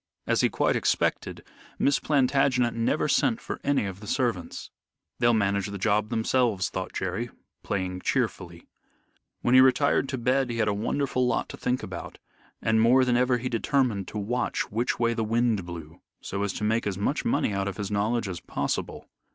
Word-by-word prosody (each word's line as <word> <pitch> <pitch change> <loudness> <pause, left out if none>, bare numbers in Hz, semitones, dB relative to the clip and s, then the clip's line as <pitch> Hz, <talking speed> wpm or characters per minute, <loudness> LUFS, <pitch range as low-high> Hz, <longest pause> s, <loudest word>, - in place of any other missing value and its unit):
As - - +2
he - - +3
quite - - +1
expected, - - 0 0.3
Miss 140 - +2
Plantagenet 130 -3 +2
never 115 0 0
sent - - +2
for - - -6
any 140 -6 +1
of 95 -1 -6
the 105 - -10
servants. 120 -9 -2 0.5
"They'll 120 -1 +4
manage 100 -2 +1
the 100 0 -5
job 105 +1 +1
themselves," 110 -5 +1
thought 95 0 -4
Jerry, 95 +6 -3 0.3
playing 90 -1 -3
cheerfully. 90 -9 -2 0.8
When 120 - +2
he 130 - +9
retired 135 +1 +3
to 130 - -2
bed 125 +2 +1
he 120 - -3
had 110 -2 +1
a 105 - +2
wonderful 125 +4 0
lot 120 - -1
to - - -7
think 125 +2 -1
about, 90 -2 -7 0.5
and 110 0 +3
more 130 +3 +5
than 125 -1 +2
ever 125 0 +3
he 125 +1 -4
determined 120 -4 0
to - - -6
watch 120 +4 -2
which 115 +4 0
way 115 -1 +1
the 115 -1 -1
wind 110 -4 +1
blew 80 -2 -9 0.2
so 100 - -4
as 100 -1 0
to - - -5
make 110 +1 +1
as 95 -2 -2
much 120 +9 -1
money 110 - +1
out 100 0 -1
of 100 - -4
his 105 -2 -4
knowledge 110 +2 0
as 90 -2 -5
possible. - - -3
115 Hz, 190 wpm, -26 LUFS, 100-125 Hz, 0.8 s, he